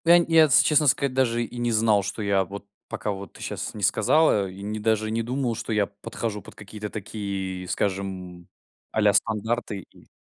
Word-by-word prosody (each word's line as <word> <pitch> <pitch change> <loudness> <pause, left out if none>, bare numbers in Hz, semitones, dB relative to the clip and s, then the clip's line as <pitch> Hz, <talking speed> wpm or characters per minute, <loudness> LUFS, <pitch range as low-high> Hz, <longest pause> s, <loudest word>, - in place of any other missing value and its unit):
Ну, 165 - +5
я - - +9
нь 170 - +2
я, 165 -1 +7
если 140 - +5
честно 150 -1 +4
сказать, 135 +1 +2
даже 120 -2 +1
и 120 - -8
не 120 0 0
знал, 110 -2 +3
что 105 +2 -5
я 100 -1 +2
вот 100 +2 -9 0.2
пока 105 - -3
вот 100 0 -8
ты - - -14
щас - - -5
не - - -6
сказала. 110 -11 +3
И 95 +2 -10
не 105 +1 -4
даже 110 0 0
и - - -4
не 115 +1 0
думал, 125 +1 -2
что 115 - -6
я 105 -2 +2
подхожу 105 +1 -5
под - - -14
какие-то 105 +1 -8
такие, 95 -3 -5
скажем, 95 -3 -3 0.4
а-ля 105 -2 +3
стандарты 110 -2 0
и - - -20
105 Hz, 210 wpm, -25 LUFS, 100-120 Hz, 0.4 s, я